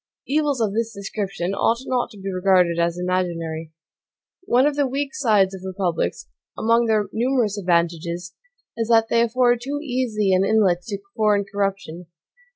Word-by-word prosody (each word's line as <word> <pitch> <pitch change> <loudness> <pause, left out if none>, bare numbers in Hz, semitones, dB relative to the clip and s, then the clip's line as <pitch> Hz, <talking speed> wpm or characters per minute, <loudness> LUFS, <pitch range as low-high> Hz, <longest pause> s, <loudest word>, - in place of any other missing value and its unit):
Evils 290 -1 0
of 215 -3 0
this 230 +1 -1
description 195 -2 -4
ought 230 +3 +2
not 250 -1 -1
to 215 - -14
be 195 0 -5
regarded 180 -2 +3
as 170 0 0
imaginary. 170 -3 -2 0.7
One 255 -2 +3
of 295 -1 +1
the 285 -2 +1
weak 275 +2 -3
sides 210 -9 +2
of 190 - -8
republics, 180 - -2 0.3
among 230 +1 +2
their 215 -2 +2
numerous 240 -3 +1
advantages, 170 -2 -1 0.4
is 230 -1 -2
that 225 -1 +4
they 230 - +3
afford 240 0 +2
too 280 +3 -3
easy 240 -8 0
an 185 +1 +3
inlet 195 -4 +2
to 205 -3 -3 0.2
foreign 210 -2 +2
corruption. 195 -4 -3
205 Hz, 160 wpm, -22 LUFS, 180-235 Hz, 0.7 s, that